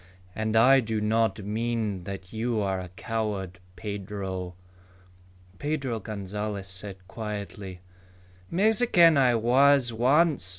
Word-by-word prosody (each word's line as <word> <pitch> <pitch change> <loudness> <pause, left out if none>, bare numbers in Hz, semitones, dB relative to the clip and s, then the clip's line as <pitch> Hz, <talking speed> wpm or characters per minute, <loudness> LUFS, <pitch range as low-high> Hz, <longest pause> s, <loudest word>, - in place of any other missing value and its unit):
"And 110 0 -1
I 130 +4 +7
do 110 -3 -2
not 110 0 +1
mean 110 -2 -2
that 95 -1 -7
you 115 0 -1
are 95 -2 -1
a 90 - -8
coward, 100 -2 -4 0.2
Pedro." 95 -2 -5 1.0
Pedro 135 -6 -2
Gonzalez 105 -1 -5
said 95 0 -8
quietly, 100 -3 -6 0.7
"Mexican 195 -4 +4
I 130 -3 +4
was 125 +2 +4
once. 135 - +2
110 Hz, 110 wpm, -27 LUFS, 100-120 Hz, 1.0 s, I